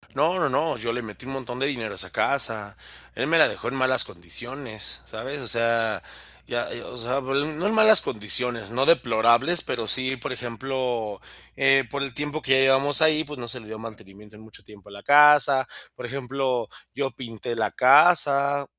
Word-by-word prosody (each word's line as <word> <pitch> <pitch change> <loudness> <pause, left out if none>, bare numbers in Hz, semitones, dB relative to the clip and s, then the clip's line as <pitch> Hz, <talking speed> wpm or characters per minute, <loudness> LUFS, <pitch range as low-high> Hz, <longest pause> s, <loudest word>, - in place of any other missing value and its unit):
No, 160 +7 +1
no, 150 -5 +1
no, 150 +3 -1
yo 115 0 -4
le 125 - -4
metí 110 +1 -11
un 135 - -7
montón 125 -2 -7
de 135 - 0
dinero 120 -6 -4
a - - -8
esa 95 -2 -3
casa, 110 -7 0 0.4
él - - -3
me - - +3
la - - +6
dejó - - -7
en 130 - -3
malas 130 -1 +1
condiciones, 110 - -7
¿sabes?, 135 +6 -7
o 125 - -7
sea, 115 -3 0 0.5
ya, 120 0 -3
eh, 120 - -6
o - - -9
sea, 125 +3 -2
bueno, 140 +2 -2
no 165 +6 -3
en 220 - 0
malas 220 -2 +6
condiciones, 115 0 0
no 130 +3 0
deplorables, 120 +3 +3
pero 115 -3 -4
sí, 130 +5 0
por 125 0 -7
ejemplo, 120 -3 -4 0.4
eh, 135 0 +4
por 140 - -4
el 135 -3 -5
tiempo 150 +3 -5
que 135 - +2
ya 130 - +4
llevabamos 135 +3 +4
ahí, 155 0 +3
pues, 150 -1 -9
no 120 -1 -7
se 125 - -3
le 110 - -14
dio 110 - -8
mantenimiento, 105 -1 -13
en 110 - -15
mucho 110 - -15
tiempo 105 -2 -17
a 100 - -13
la 100 - -12
casa, 145 -2 +5 0.3
por - - -9
ejemplo, 130 -2 -3 0.3
yo 135 -1 -2
pinté 115 -3 -7
la 110 - -1
casa 140 0 +4
130 Hz, 205 wpm, -24 LUFS, 115-140 Hz, 0.5 s, la